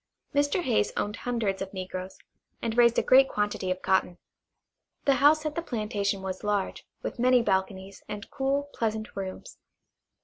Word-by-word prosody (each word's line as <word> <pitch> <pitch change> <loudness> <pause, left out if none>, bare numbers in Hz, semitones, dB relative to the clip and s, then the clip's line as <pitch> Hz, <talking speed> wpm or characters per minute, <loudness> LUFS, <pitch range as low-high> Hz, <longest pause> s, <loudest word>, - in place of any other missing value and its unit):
Mr. 285 +5 +2
Hayes 230 -7 +1
owned 205 +1 -1
hundreds 225 -6 -2
of 195 0 -4
negroes, 185 0 -6 0.4
and 230 -1 -2
raised 235 -1 +5
a - - +3
great 270 +1 +6
quantity 205 -2 -1
of 185 0 -2
cotton. 190 -2 +1 0.9
The 275 -2 +4
house 305 +2 +5
at 305 - -1
the 335 - -2
plantation 210 - -2
was 190 +1 -5
large, 205 -2 -1 0.2
with - - -5
many 250 0 +4
balconies, 190 -1 -1
and 205 -1 -6
cool, 280 +1 -1
pleasant 220 0 -2
rooms. 190 -1 -7
210 Hz, 160 wpm, -28 LUFS, 190-255 Hz, 0.9 s, great